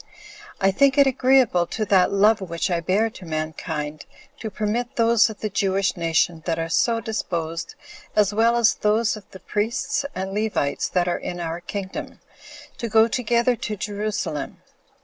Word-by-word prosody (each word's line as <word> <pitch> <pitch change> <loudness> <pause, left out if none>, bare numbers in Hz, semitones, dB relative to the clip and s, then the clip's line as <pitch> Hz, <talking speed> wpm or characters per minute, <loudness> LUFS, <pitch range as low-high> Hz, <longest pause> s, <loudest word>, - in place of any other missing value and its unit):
I 195 0 +3
think 270 +7 +3
it 280 - +7
agreeable 255 -9 +3
to 220 - -2
that 185 -2 +3
love 205 +2 +4
which 170 -1 -2
I 170 - +1
bear 205 +7 +1
to 190 - -12
mankind, 155 -1 -4 0.3
to 220 - -4
permit 215 +4 -2
those 230 -1 +4
of 215 - -10
the 215 - -1
Jewish 195 0 +1
nation 165 -1 +1
that 165 -1 0
are 165 0 -3
so 230 +6 +2
disposed, 170 -7 -4 0.4
as 210 -1 +3
well 230 +2 +3
as 235 -2 +4
those 215 +2 +1
of 215 - -13
the 190 - -12
priests 240 +9 -1
and 190 +1 -4
Levites 210 -9 -1
that 180 -1 +1
are 175 - 0
in 175 - -5
our 170 0 -4
kingdom, 190 +1 -6 0.6
to 235 - -3
go 220 +1 +5
together 240 +1 +1
to 215 - -4
Jerusalem. 200 -8 -3
205 Hz, 170 wpm, -23 LUFS, 175-225 Hz, 0.6 s, it